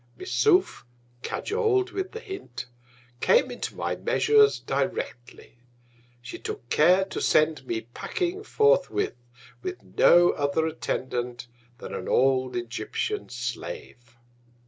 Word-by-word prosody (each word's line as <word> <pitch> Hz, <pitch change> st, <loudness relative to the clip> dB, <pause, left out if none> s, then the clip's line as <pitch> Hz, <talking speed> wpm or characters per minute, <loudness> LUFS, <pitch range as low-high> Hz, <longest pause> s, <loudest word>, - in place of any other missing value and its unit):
Missouf, 125 Hz, -, +2 dB, 0.4 s
(cajol'd 405 Hz, -, 0 dB
with 380 Hz, -1 st, -3 dB
the 450 Hz, -, -6 dB
Hint) 385 Hz, -, -7 dB, 0.5 s
came 485 Hz, -, +3 dB
into -, -, -5 dB
my -, -, -2 dB
Measures 430 Hz, -1 st, +4 dB
directly. 120 Hz, -1 st, -4 dB, 0.6 s
She -, -, -8 dB
took 120 Hz, -, -6 dB
care 180 Hz, +5 st, +4 dB
to 195 Hz, -, -5 dB
send 155 Hz, -3 st, +2 dB
me 110 Hz, -1 st, -2 dB
packing 350 Hz, -, -4 dB
forthwith, 430 Hz, -, +1 dB, 0.3 s
with 370 Hz, 0 st, -6 dB
no 175 Hz, 0 st, +5 dB
other 145 Hz, +2 st, 0 dB
Attendant 125 Hz, -6 st, -3 dB, 0.3 s
than -, -, -8 dB
an -, -, -5 dB
old 130 Hz, -1 st, +2 dB
Egyptian 120 Hz, -, -3 dB
Slave. 135 Hz, -, -7 dB
165 Hz, 110 wpm, -26 LUFS, -, 0.6 s, no